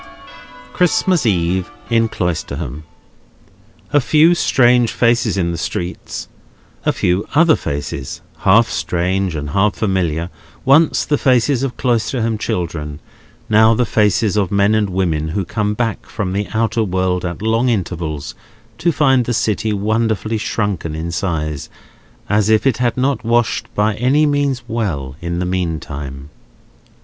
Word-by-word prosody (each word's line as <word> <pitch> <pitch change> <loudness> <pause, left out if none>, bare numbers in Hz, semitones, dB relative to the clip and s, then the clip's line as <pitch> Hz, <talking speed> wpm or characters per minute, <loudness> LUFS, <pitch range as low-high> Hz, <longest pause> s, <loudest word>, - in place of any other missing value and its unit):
Christmas 180 - +2
Eve 90 -1 0 0.2
in 115 -1 +3
Cloisterham. 80 -4 -3 1.1
A 145 - +5
few 155 +6 +4
strange 125 -7 +3
faces 115 -3 +1
in 85 -2 0
the 85 - -4
streets; 90 0 -4 0.6
a - - +5
few 90 +3 0
other 160 +1 +5
faces, 70 -2 -5 0.2
half 110 +4 +4
strange 85 +3 -1
and 75 -1 -4
half 100 +4 +2
familiar, 90 -5 -1 0.3
once 145 +4 +4
the 145 -1 0
faces 130 0 +2
of 135 -2 -3
Cloisterham 115 -2 0
children, 80 -7 -3 0.5
now 110 +1 +5
the 125 - +1
faces 105 -1 +2
of 100 -4 +1
men 100 +1 +3
and 105 -2 +1
women 85 -5 -1
who 95 +4 -2
come 105 +2 -1
back 115 -2 -2
from 95 -3 -3
the 100 +1 -1
outer 115 0 +1
world 95 -2 -1
at 90 +4 -4
long 115 +3 +2
intervals 85 - -3 0.5
to 170 - +2
find 135 -5 +3
the 120 - -1
city 110 +1 0
wonderfully 110 +1 0
shrunken 100 -8 -2
in 80 +2 -4
size, 75 -5 -3 0.6
as 105 +1 +2
if 110 +2 +3
it 135 -5 +2
had 125 -1 0
not 135 +1 0
washed 115 -1 0
by 105 +1 +2
any 135 +6 +3
means 145 -3 0
well 80 - -3
in 85 0 -3
the 90 - -1
meanwhile. 75 -6 -4
105 Hz, 140 wpm, -18 LUFS, 85-120 Hz, 1.1 s, A